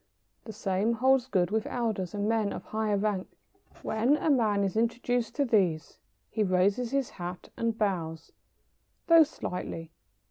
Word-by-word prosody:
The 220 - -7
same 205 +1 0
holds 260 +2 +3
good 185 -7 +1
with 220 0 0
elders 215 -6 -2
and 205 0 -1
men 220 -2 +1
of - - -6
higher 215 -1 -1
rank. 200 -2 -1 0.6
When 235 +7 +2
a 310 - +1
man 215 -6 +2
is 195 0 -1
introduced 235 +1 0
to 285 - +1
these 185 - +1 0.3
he 220 - -1
raises 200 +5 +2
his 275 -1 -1
hat 180 0 -7
and 230 -1 -1
bows, 165 -6 -2 0.7
though 335 -1 +7
slightly. 165 - -3
215 Hz, 150 wpm, -29 LUFS, 190-235 Hz, 0.7 s, though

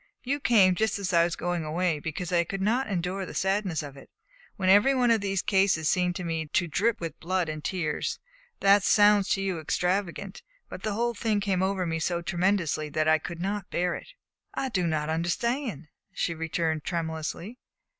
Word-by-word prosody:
You 280 +3 -1
came 205 -8 +5
just 220 +4 0
as 195 -2 -3
I 170 0 +6
was 170 - -2
going 175 -1 -2
away 160 +1 0
because 160 +4 -5
I 170 -1 +4
could 195 +3 -5
not 235 +7 +1
endure 185 0 -2
the - - -8
sadness 190 -4 0
of 140 -2 -9
it; 135 - -14 0.5
when 190 -3 -2
every 205 +8 +6
one 245 -2 +3
of 225 -2 +3
these 195 -2 -1
cases 190 -5 +2
seemed 180 0 +1
to 180 - -4
me 165 -2 -2
to 175 +3 0
drip 210 +8 +1
with 165 -2 -6
blood 185 0 -1
and 155 -1 -5
tears. 165 -4 -2 0.4
That 200 +1 +6
sounds 205 0 +4
to 195 - -3
you 190 -4 -1
extravagant, 180 +4 -2 0.3
but - - -8
the 215 - -2
whole 235 +3 0
thing 215 -1 0
came 195 -2 0
over 190 -1 0
me 165 -1 -2
so 170 +1 -1
tremendously 175 -4 0
that 155 +1 0
I 160 0 +5
could 170 +3 -5
n't 200 -1 -3
bear 180 0 0
it." - - -9 0.4
"I 265 - -1
do 180 -7 0
not 155 -2 -1
understand," 175 - -1 0.2
she 170 - -1
returned 160 -1 -2
tremulously. 170 +6 -4
180 Hz, 195 wpm, -27 LUFS, 165-200 Hz, 0.5 s, I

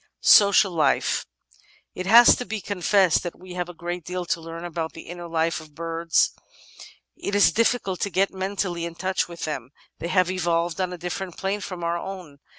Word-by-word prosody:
Social 200 -1 +6
Life 165 -3 +1 0.7
It 185 - -5
has 235 +4 +8
to - - -3
be 220 -3 -4
confessed 195 -2 +2
that 175 - -6
we 185 0 -10
have 180 -1 -3
a - - -8
great 175 +1 -5
deal 180 +2 -4
to 170 - -2
learn 165 +1 -7
about 165 -1 -4
the 165 - -10
inner 175 0 -8
life 165 0 -1
of 155 -2 -16
birds. 165 0 +1 0.8
It 200 - -4
is 205 - +5
dif&cult 225 -5 0
to 200 - -1
get 195 +1 +1
mentally 190 -3 -3
in 170 0 -7
touch 185 +2 -1
with 170 -1 -6
them; 135 -6 -5 0.3
they 170 - -4
have 185 0 +2
evolved 170 -1 -1
on 185 -1 -1
a 180 - -6
different 180 +1 -5
plane 195 +2 -2
from 185 -3 -6
our 170 +1 -1
own. 180 -7 -8
175 Hz, 195 wpm, -24 LUFS, 170-190 Hz, 0.8 s, has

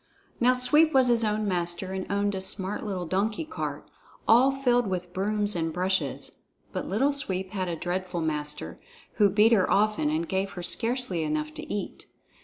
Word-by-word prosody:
Now 250 +1 +4
Sweep 300 +5 +4
was 260 -2 +5
his 235 -1 +3
own 215 0 0
master 175 0 -2
and 190 0 -4
owned 205 0 +1
a 190 - -3
smart 190 +1 -1
little 190 -4 -3
donkey 210 - -1
cart, 320 - -5 0.4
all 250 +4 +6
filled 245 -4 +1
with 180 -2 -4
brooms 205 +1 +1
and 165 -1 -1
brushes; 185 +3 -2 0.3
but - - -3
Little 270 +8 +1
Sweep 190 -9 -3
had 185 -3 -2
a 170 - -2
dreadful 180 +1 -3
master, 150 -2 -4 0.4
who 205 -2 +5
beat 210 +4 +4
her 205 -5 +4
often 210 -7 +2
and 160 +2 -1
gave 195 +1 -2
her 175 - -6
scarcely 230 -5 0
enough 155 0 -2
to - - -8
eat. 205 - -5
195 Hz, 180 wpm, -27 LUFS, 180-225 Hz, 0.4 s, all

